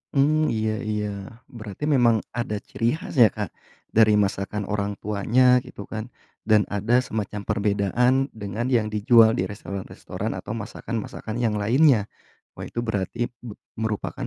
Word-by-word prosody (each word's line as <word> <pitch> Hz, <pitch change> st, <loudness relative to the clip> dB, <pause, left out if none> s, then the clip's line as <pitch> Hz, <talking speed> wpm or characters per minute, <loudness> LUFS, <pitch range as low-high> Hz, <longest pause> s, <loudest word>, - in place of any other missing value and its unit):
Mmm, 155 Hz, +3 st, +3 dB
iya 110 Hz, 0 st, 0 dB
iya. 105 Hz, -1 st, -2 dB, 0.4 s
Berarti 110 Hz, 0 st, -8 dB
memang 120 Hz, -7 st, +3 dB
ada 120 Hz, -2 st, -3 dB
ciri 115 Hz, +5 st, -1 dB
khas 160 Hz, -, -8 dB
ya, 115 Hz, -, +9 dB
Kak, -, -, -5 dB, 0.4 s
dari 110 Hz, -1 st, +5 dB
masakan 100 Hz, 0 st, 0 dB
orang 100 Hz, 0 st, -1 dB
tuanya, 120 Hz, +5 st, +3 dB
gitu 125 Hz, -5 st, -10 dB
kan, 110 Hz, +2 st, -6 dB, 0.4 s
dan 110 Hz, -1 st, +5 dB
ada 115 Hz, +5 st, +2 dB
semacam 105 Hz, -3 st, -4 dB
perbedaan 110 Hz, +8 st, +1 dB
dengan 110 Hz, +4 st, -4 dB
yang 115 Hz, -4 st, +2 dB
dijual 110 Hz, +1 st, +5 dB
di 90 Hz, -, 0 dB
restoran-restoran 100 Hz, -2 st, -6 dB
atau -, -, -5 dB
masakan-masakan 110 Hz, -, -5 dB
yang 105 Hz, -2 st, +1 dB
lainnya. 120 Hz, 0 st, +4 dB, 0.5 s
Wah, -, -, -5 dB
itu 120 Hz, -, -4 dB
berarti 115 Hz, +1 st, -2 dB
be 115 Hz, -3 st, -9 dB, 0.2 s
merupakan 110 Hz, -2 st, -3 dB
110 Hz, 145 wpm, -24 LUFS, 105-120 Hz, 0.5 s, ya